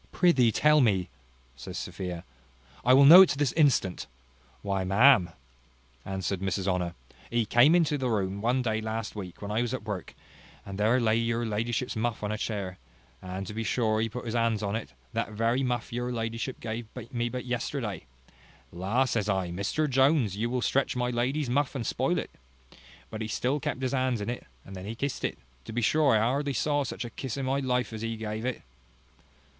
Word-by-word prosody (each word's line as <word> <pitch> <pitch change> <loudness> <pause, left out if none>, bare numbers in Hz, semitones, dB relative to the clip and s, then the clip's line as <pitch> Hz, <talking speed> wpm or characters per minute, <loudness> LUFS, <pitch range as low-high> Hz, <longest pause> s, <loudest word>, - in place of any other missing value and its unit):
"Prithee 135 -11 +4
tell 150 +5 +4
me," 95 -7 +2 0.5
says - - -8
Sophia; 90 -3 -5 0.6
"I 125 - +4
will 135 +2 +7
know 170 +6 +11
it 190 - +7
this 145 -4 +1
instant." 140 - +2 0.6
"Why, 100 -2 -1
ma'am," 100 0 +5 0.7
answered 95 -1 -3
Mrs 95 0 -1
Honour, 90 -2 -1 0.3
"he 120 -1 +1
came 120 +9 +5
into 155 -4 +2
the 130 -1 -1
room 100 -2 -1
one 125 +3 +1
day 110 -2 0
last 110 -1 -4
week 95 -2 -8
when 100 - -4
I 110 +2 +1
was 120 +1 -1
at 125 - -7
work, 105 -4 -6 0.5
and 100 0 -7
there 110 +5 +3
lay 115 -2 +2
your 115 0 0
ladyship's 115 +3 -2
muff 110 0 -2
on 105 - -1
a 110 - -2
chair, 100 -4 -4 0.4
and 95 +1 -5
to 105 - -7
be 115 +1 -3
sure 110 0 +1
he 115 - 0
put 125 +3 -7
his 115 - -3
hands 115 -2 +1
into 100 +2 -1
it; 85 - -12 0.2
that 105 - -2
very 115 +4 +1
muff 120 -3 -2
your 120 +1 -2
ladyship 115 +2 -3
gave 115 0 -5 0.2
me 120 -1 -1
but 125 +1 -5
yesterday. 120 - -3 0.6
La! 100 +10 0
says 110 -4 -1
I, 95 -3 0
Mr 100 - -1
Jones, 135 - +3
you 115 +3 -1
will 125 0 -1
stretch 135 -1 +1
my 125 0 0
lady's 130 +5 0
muff, 140 +3 0
and 120 -4 -3
spoil - - 0
it: - - -4 0.8
but 110 - -5
he 110 - -2
still 125 +6 -1
kept 130 0 -3
his 130 - -1
hands 130 -3 +1
in 105 +3 -2
it: 120 - -7 0.2
and 95 - -10
then 95 0 -7
he 115 - -5
kissed 140 +3 -3
it - - -2 0.3
to - - -7
be 120 +1 -2
sure 145 0 +4
I 105 - +3
hardly 140 +5 0
ever - - -2
saw 145 -1 +1
such 130 - -5
a 120 - -7
kiss 130 -1 -5
in 135 - -2
my 135 +1 +1
life 125 -3 -1
as 110 - -6
he 115 0 -3
gave 110 +1 -4
it." 130 -2 -3
115 Hz, 205 wpm, -28 LUFS, 105-130 Hz, 0.8 s, know